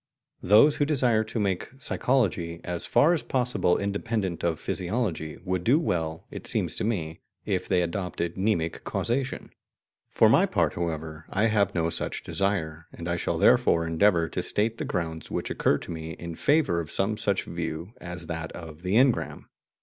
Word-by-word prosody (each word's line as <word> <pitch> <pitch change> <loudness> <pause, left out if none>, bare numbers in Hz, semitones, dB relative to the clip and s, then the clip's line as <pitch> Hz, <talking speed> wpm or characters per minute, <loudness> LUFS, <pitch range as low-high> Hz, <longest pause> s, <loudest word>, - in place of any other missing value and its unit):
Those 110 +10 +6
who 145 - +2
desire 125 -7 +2
to 110 +1 -4
make 95 -3 -1
psychology 100 -11 0
as 85 -1 -3
far 160 +4 +4
as 165 - 0
possible 125 -8 +1
independent 100 -2 -2
of 85 -2 0
physiology 90 -6 -2
would 90 -1 -1
do 125 +9 +4
well, 80 - -2
it - - -7
seems - - 0
to - - -1
me, 85 -8 -2 0.3
if - - -1
they 90 -2 +2
adopted 85 -1 -3
mnemic 95 -5 -1
causation. 130 +2 -2 0.6
For - - +4
my - - +5
part, - - +1
however, 80 -2 -4
I 100 +3 +1
have 105 -4 +1
no 85 -1 +1
such - - -3
desire, 85 -5 -2
and 85 - -8
I 85 - 0
shall 85 - -1
therefore 85 0 +4
endeavour 85 0 +3
to - - -2
state 110 +2 0
the - - -2
grounds 80 -3 -3
which - - -3
occur 70 - +2
to - - -8
me 80 0 -5
in 85 +1 -7
favour 145 - +2
of 80 -3 -5
some 100 +3 0
such 100 -2 0
view 85 +3 -5
as 90 -1 -6
that 80 -1 -5
of 80 -2 -9
the 90 +3 -1
"engram." 130 +1 +2
90 Hz, 175 wpm, -27 LUFS, 85-110 Hz, 0.6 s, Those